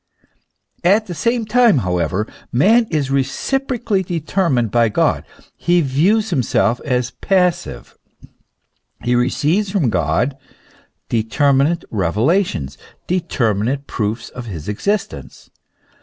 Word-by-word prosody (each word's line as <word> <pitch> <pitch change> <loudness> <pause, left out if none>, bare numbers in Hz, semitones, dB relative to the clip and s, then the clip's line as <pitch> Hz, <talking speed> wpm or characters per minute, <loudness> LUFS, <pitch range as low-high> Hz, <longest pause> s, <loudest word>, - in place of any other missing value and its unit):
At 205 +5 +3
the 180 - -6
same 230 +8 0
time, 230 - +4
however, 90 +3 0 0.3
man 220 - +4
is 145 -5 -1
reciprocally 235 - -1
deter 175 +1 -1
mined 120 -5 +1
by 115 -1 +3
God; 105 - +1 0.3
he 175 0 +2
views 185 +10 +1
himself 125 -4 +1
as 125 -3 -1
passive; 180 - -1 1.1
he 120 +1 +1
receives 150 +11 +1
from 180 - +1
God 90 - 0 0.7
determinate 140 +8 +1
revelations, 100 - 0 0.3
determinate 135 - -1
proofs 110 -1 -3
of 120 -2 -9
his 85 -8 -7
exist 200 - -1
ence. - - -12
140 Hz, 110 wpm, -18 LUFS, 115-190 Hz, 1.1 s, time